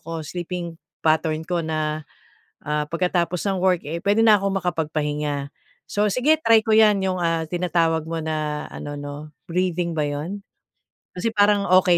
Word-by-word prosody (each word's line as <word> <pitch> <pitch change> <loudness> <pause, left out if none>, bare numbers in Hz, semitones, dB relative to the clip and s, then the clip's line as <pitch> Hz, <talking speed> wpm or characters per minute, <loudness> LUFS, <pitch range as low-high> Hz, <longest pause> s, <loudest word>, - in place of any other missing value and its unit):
ko 165 -1 -6
sleeping 175 0 -5 0.3
pattern 155 0 +2
ko 175 0 -1
na, 155 -1 -2 0.6
ah, 150 0 -1
pagkatapos 175 0 0
ng 190 -1 -1
work, 180 -2 +2
eh, 165 +3 -3
puwede 205 +4 +3
na 215 -2 +7
akong 195 0 -1
makapagpahinga. 150 -4 -2 0.4
So, 205 +1 +1
sige 290 +9 +3
try 225 -7 +5
ko 220 - -1
yan 210 -3 +5
yung, 185 -1 0
ah, 165 -1 +1
tinatawag 165 -2 0
mo 165 0 -3
na 155 -1 -2
ano 145 0 -6
'no 145 +1 -8 0.2
breathing 180 -1 0
ba 150 -2 0
'yon? 150 +8 -4 0.8
Kasi 225 +5 -1
parang 205 -1 +4 0.2
okey 175 -1 +4
170 Hz, 160 wpm, -23 LUFS, 155-190 Hz, 0.8 s, na